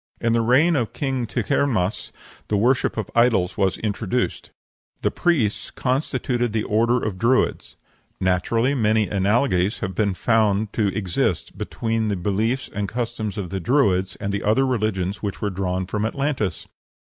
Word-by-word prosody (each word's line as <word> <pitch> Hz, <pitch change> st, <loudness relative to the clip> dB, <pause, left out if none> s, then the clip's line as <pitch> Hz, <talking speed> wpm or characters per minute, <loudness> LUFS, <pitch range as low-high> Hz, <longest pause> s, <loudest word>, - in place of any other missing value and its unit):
In 115 Hz, -1 st, +1 dB
the 115 Hz, -, +3 dB
reign 140 Hz, +9 st, +4 dB
of 120 Hz, -6 st, -1 dB
King 130 Hz, -4 st, -2 dB
Tighernmas 110 Hz, -4 st, 0 dB, 0.4 s
the 105 Hz, -, +1 dB
worship 120 Hz, +4 st, +2 dB
of 110 Hz, -, -3 dB
idols 110 Hz, -6 st, +3 dB
was 95 Hz, -1 st, +1 dB
introduced. 110 Hz, +3 st, -2 dB, 0.5 s
The -, -, +2 dB
priests 140 Hz, -, 0 dB
constituted 125 Hz, -3 st, -1 dB
the 110 Hz, -1 st, 0 dB
Order 115 Hz, +3 st, +2 dB
of 100 Hz, -4 st, -3 dB
Druids. 115 Hz, -, +1 dB, 0.4 s
Naturally 115 Hz, +8 st, +1 dB
many 110 Hz, -4 st, +2 dB
analogies 100 Hz, -1 st, +1 dB
have 95 Hz, -, -3 dB
been 100 Hz, -2 st, 0 dB
found 110 Hz, -1 st, +1 dB
to 110 Hz, -3 st, +1 dB
exist 95 Hz, -5 st, -1 dB
between 115 Hz, -1 st, -2 dB
the 105 Hz, -, 0 dB
beliefs 105 Hz, +8 st, -1 dB
and 100 Hz, -1 st, -4 dB
customs 115 Hz, -4 st, -3 dB
of 95 Hz, -3 st, -4 dB
the 95 Hz, -, -2 dB
Druids 95 Hz, -, +2 dB
and 100 Hz, 0 st, -4 dB
the 100 Hz, -, -1 dB
other 110 Hz, +6 st, +2 dB
religions 105 Hz, -6 st, -1 dB
which 100 Hz, -3 st, -4 dB
were 105 Hz, -, -1 dB
drawn 95 Hz, 0 st, -2 dB
from 105 Hz, +3 st, -2 dB
Atlantis. 130 Hz, -, -2 dB
110 Hz, 155 wpm, -23 LUFS, 100-120 Hz, 0.5 s, reign